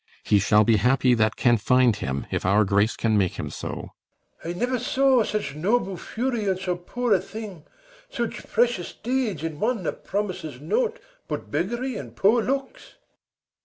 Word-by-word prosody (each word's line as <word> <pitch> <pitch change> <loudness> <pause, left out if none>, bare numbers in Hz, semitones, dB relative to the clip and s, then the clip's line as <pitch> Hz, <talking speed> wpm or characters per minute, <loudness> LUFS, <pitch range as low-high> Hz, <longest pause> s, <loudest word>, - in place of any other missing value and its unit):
He 105 - +3
shall 105 +2 +4
be 110 +1 +4
happy 125 +4 +3
that 110 -2 +2
can 120 -2 +3
find 125 +1 +3
him, 70 -9 -3
if - - -1
Our 100 +3 +4
grace 100 +3 +2
can 110 -2 +2
make 95 -3 +1
him - - -4
so. - - -6 0.5
BELARIUS. 170 +1 -4
I - - -8
never 250 +1 0
saw 260 +1 +3
Such 210 -10 -3
noble 195 +5 0
fury 235 +4 -3
in 190 -2 +1
so 185 -1 -2
poor 230 +6 -1
a 190 - +4
thing; 205 -8 -8 0.4
Such 235 - -4
precious 235 -6 +1
deeds 235 - -2
in 160 -2 -4
one 225 -2 0
that - - -4
promis'd 185 -9 -3
nought 455 - 0 0.3
But - - -5
beggary 235 - -2
and - - -8
poor 225 +5 +4
looks. 270 +3 -4
185 Hz, 175 wpm, -25 LUFS, -, 0.5 s, shall